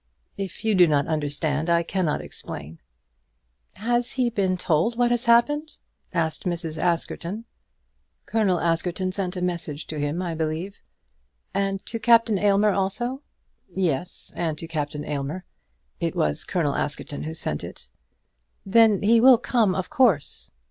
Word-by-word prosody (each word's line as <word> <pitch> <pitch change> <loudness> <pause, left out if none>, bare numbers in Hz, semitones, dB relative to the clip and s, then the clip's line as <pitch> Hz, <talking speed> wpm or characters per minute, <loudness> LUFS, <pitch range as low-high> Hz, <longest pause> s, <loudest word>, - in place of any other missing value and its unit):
"If 195 +1 -6
you 220 - +3
do 180 -3 +6
not 145 -2 +2
understand 150 +1 -1
I 170 0 +3
cannot 170 -3 -1
explain." 80 +3 -8 1.0
"Has 240 +3 0
he 250 -2 +1
been 190 -4 0
told 180 +7 +1
what 240 0 +3
has 240 +1 +1
happened?" 295 +7 +3 0.3
Mrs. 165 -1 -2
Askerton 170 +1 -1
asked. - - -48
"Colonel 200 -6 +1
Askerton 175 +3 0
sent 185 -1 -3
a 180 - -2
message 170 -4 -3
to 155 - -6
him, 145 +3 -1
I 175 -2 -2
believe." 160 +5 -3 0.8
"And 195 0 -1
to 230 - -3
Captain 230 -3 +4
Aylmer 205 +1 +3
also?" 240 +8 -1 0.5
"Yes; 175 -2 0
and 160 -3 -2
to 165 - -6
Captain 150 -2 -4
Aylmer. 150 +5 -4 0.5
It 165 -2 -2
was 75 -1 0
Colonel 165 -6 0
Askerton 145 0 -3
who 160 +1 -5
sent 75 - -1
it." - - -8 0.7
"Then 215 0 +4
he 225 +2 +5
will 255 0 +8
come, 220 -6 +1
of 185 - -3
course." 210 - +2
180 Hz, 145 wpm, -24 LUFS, 160-215 Hz, 1.0 s, will